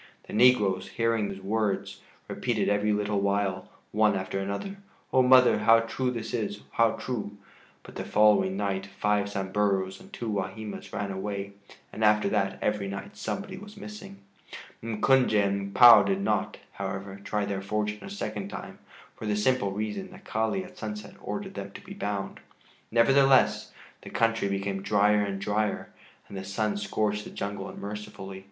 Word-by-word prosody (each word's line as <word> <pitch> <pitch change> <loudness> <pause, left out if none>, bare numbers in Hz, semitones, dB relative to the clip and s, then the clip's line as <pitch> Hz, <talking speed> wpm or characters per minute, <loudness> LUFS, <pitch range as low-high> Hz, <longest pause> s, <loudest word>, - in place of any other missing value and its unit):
The - - -11
negroes, 105 -5 +4
hearing 115 -3 +1
his 95 0 -7
words, 105 0 -1 0.3
repeated - - -1
every 105 +1 +2
little 105 -1 0
while, 100 -1 0 0.2
one 105 0 +3
after 95 0 -3
another: 100 - -4 0.4
"Oh, 130 - +6
mother, 125 0 +6
how 115 0 +6
true 125 +3 -2
that 115 -3 -4
is, 105 -3 -2
how 115 -1 +3
true!" 105 -5 -5 0.5
but - - -12
the - - -5
following 105 -2 +3
night 100 -1 -2
five 105 +1 0
Samburus 95 -1 -1
and - - -15
two 120 - -5
Wahimas 105 +1 -4
ran 100 0 -3
away, 100 +1 -4 0.4
and 110 - -3
after 105 -1 +4
that 95 0 0
every 105 -2 0
night 100 +1 -7
somebody 195 -1 -4
was 205 +2 -11
missing. 200 -1 -9 0.6
M'Kunje 115 +2 +2
and 100 -1 +1
M'Pua 115 -1 +9
did 100 0 0
not, 105 +1 0
however, 95 0 -5
try 105 0 -1
their 100 -1 -3
fortune 105 +1 -2
a - - -7
second 105 - -4
time - - -8 0.4
for 110 - -6
the 105 - +1
simple 105 -1 +1
reason 110 - -4
that 185 +1 -14
Kali 110 - -1
at 185 0 -13
sunset 105 -1 -6
ordered 195 -1 -5
them 100 - -6
to - - -9
be 195 - -8
bound. 105 - -4 0.5
Nevertheless, 135 +3 +4 0.3
the - - -10
country 115 -2 +1
became 100 0 -2
drier 105 +1 +3
and 100 -1 -3
drier, 105 +1 -1 0.3
and - - -10
the 95 - -5
sun 105 +2 -1
scorched 105 0 -1
the - - -9
jungle 100 0 -5
unmercifully. 100 -2 -7
105 Hz, 165 wpm, -28 LUFS, 100-115 Hz, 0.6 s, M'Pua